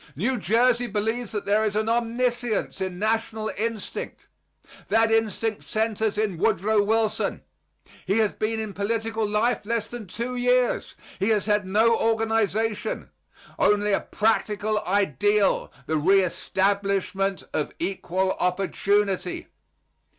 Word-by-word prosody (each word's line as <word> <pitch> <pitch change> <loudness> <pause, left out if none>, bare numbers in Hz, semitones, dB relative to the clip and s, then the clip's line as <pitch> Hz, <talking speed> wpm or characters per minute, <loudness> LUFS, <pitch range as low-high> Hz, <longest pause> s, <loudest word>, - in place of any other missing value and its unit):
New 240 - 0
Jersey 240 +5 +2
believes 220 +2 -2
that 210 -2 -3
there 210 +2 +2
is 210 -1 -1
an 215 +1 0
omniscience 240 -1 0
in 185 -1 -3
national 220 +1 -1
instinct. 225 0 -4 0.6
That 225 +2 +3
instinct 225 -1 0
centers 220 -1 -1
in 205 -6 -1
Woodrow 215 +1 +2
Wilson. 220 +1 0 0.6
He 195 +3 +2
has 215 -2 +3
been 220 +1 -2
in 215 -2 -4
political 225 +2 -1
life 220 +4 +1
less 225 +1 -1
than 240 -4 -7
two 240 +7 -4
years. 250 0 +1 0.2
He 195 +3 +1
has 210 -3 +2
had 210 -2 +1
no 220 +4 +4
organization; 225 -1 0 0.5
only 210 0 +3
a - - +3
practical 215 -1 0
ideal 200 - +2
the 155 - 0
reestablishment 195 +2 +1
of 150 - -1
equal 190 +1 -1
opportunity. 195 +1 0
215 Hz, 120 wpm, -25 LUFS, 200-225 Hz, 0.6 s, no